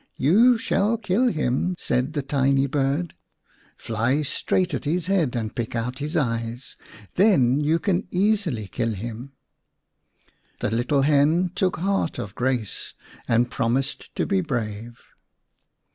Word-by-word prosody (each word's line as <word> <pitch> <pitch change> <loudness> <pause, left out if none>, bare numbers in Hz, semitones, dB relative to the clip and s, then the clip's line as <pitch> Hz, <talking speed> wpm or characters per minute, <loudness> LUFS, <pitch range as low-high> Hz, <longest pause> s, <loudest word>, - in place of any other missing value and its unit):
" - - -42
You 225 - +5
shall 220 0 +1
kill 215 +3 +1
him," 155 - 0
said 130 -1 -1
the 145 -3 -2
tiny 135 0 +2
bird. 140 +4 -1 0.3
" - - -34
Fly 115 +7 0
straight 180 +5 0
at - - -3
his 165 +3 0
head 175 -9 +1
and 110 -2 -3
pick 115 0 -3
out 125 +3 -3
his 150 +4 -2
eyes. 115 -2 -2 0.4
Then 145 - +4
you 150 +2 +2
can 180 +1 -1
easily 185 - 0
kill 115 +4 -2
him." 120 +6 -7 1.3
The - - -1
little 125 +5 +1
hen 155 +5 +3
took 185 0 0
heart 195 -1 -1
of 105 -5 -6
grace 125 -4 -2 0.3
and 120 +1 +2
promised 130 +3 -2
to - - 0
be 195 -2 +1
brave. 115 - -4
140 Hz, 145 wpm, -24 LUFS, 120-180 Hz, 1.3 s, You